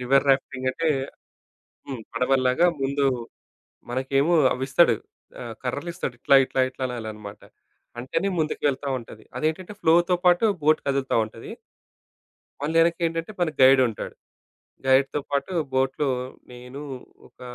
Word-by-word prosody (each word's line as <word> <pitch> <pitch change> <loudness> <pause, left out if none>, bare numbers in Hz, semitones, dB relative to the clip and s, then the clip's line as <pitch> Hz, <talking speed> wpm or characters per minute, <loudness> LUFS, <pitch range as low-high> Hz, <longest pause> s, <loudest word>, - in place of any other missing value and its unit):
River 135 +2 +2
rafting 130 -1 0
అంటే 165 +5 -1 1.0
హ్మ్. 130 -5 -6
పడవల్లాగా 130 +5 +2 0.2
ముందు 140 +1 0 0.9
మనకేమో 135 +6 +1 0.2
అవిస్తాడు. 135 +1 +3 0.5
ఆహ్, 115 -2 -7
కర్రలిస్తాడు 145 +1 -4
ఇట్లా 140 - +5
ఇట్లా 130 - -2
ఇట్లా 130 0 -5
అనాలనమాట. 110 -4 -7 0.6
అంటేనే 165 +10 -1
ముందుకు 155 -1 -2
వెళ్తా 140 +1 -2
ఉంటది. 110 -2 -13
అదేంటంటే 160 +8 -2
ఫ్లోతో 175 +2 +4
పాటు 175 +4 +4 0.2
బోట్ 155 +1 +3
కదులుతా 135 -2 0
ఉంటది. 110 +1 -11 1.1
మళ్ళీ 160 +3 -1
యెనకేంటంటే 165 +2 0
మనకి 155 -4 0
గైడ్ 130 0 +7
ఉంటాడు. 110 - -7 0.7
గైడ్‌తో 135 +2 +3
పాటు 140 +6 -1 0.2
బోట్‌లో 135 +2 0 0.4
నేను 125 +3 -10 0.5
ఒక - - -26
135 Hz, 115 wpm, -24 LUFS, 125-160 Hz, 1.1 s, గైడ్